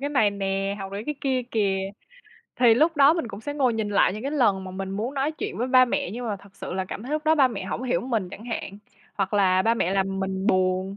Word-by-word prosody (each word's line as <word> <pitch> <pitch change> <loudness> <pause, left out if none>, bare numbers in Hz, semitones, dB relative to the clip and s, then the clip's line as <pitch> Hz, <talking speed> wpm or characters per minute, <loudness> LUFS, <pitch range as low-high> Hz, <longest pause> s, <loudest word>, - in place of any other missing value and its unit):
cái 285 - -2
này 255 -8 +3
nè, 195 0 -2
học 195 -1 -7
được 200 - -4
cái 300 - -2
kia 260 -2 0
kìa." 195 -3 0 0.7
Thì 240 -2 +6
lúc 315 +6 +2
đó 280 +1 +7
mình 330 -8 -2
cũng 200 - -8
sẽ 290 +5 -5
ngồi 260 -5 +2
nhìn 220 -2 -2
lại 200 -3 +3
những 215 +3 -6
cái 275 - -2
lần 205 -10 +2
mà 185 - -7
mình 190 +1 -5
muốn 220 +8 -3
nói 280 +3 0
chuyện 310 - -5
với 245 - 0
ba 255 -1 +6
mẹ, 240 - -2
nhưng 240 +4 -5
mà 210 -3 -2
thật 195 0 -19
sự - - -6
là 190 +1 -2
cảm 190 - -7
thấy 260 +5 -6
lúc 305 0 -1
đó 315 0 +4
ba 275 -4 +5
mẹ 200 -6 -5
hổng 200 - -4
hiểu 255 0 0
mình 225 -7 -2
chẳng 215 - -10
hạn, 225 -4 -5 0.4
hoặc 195 0 -1
là 185 -2 +4
ba 230 +2 +3
mẹ 185 -6 0
làm 195 0 0
mình 190 0 -2
buồn. 185 -1 +1
210 Hz, 280 wpm, -25 LUFS, 195-255 Hz, 0.7 s, đó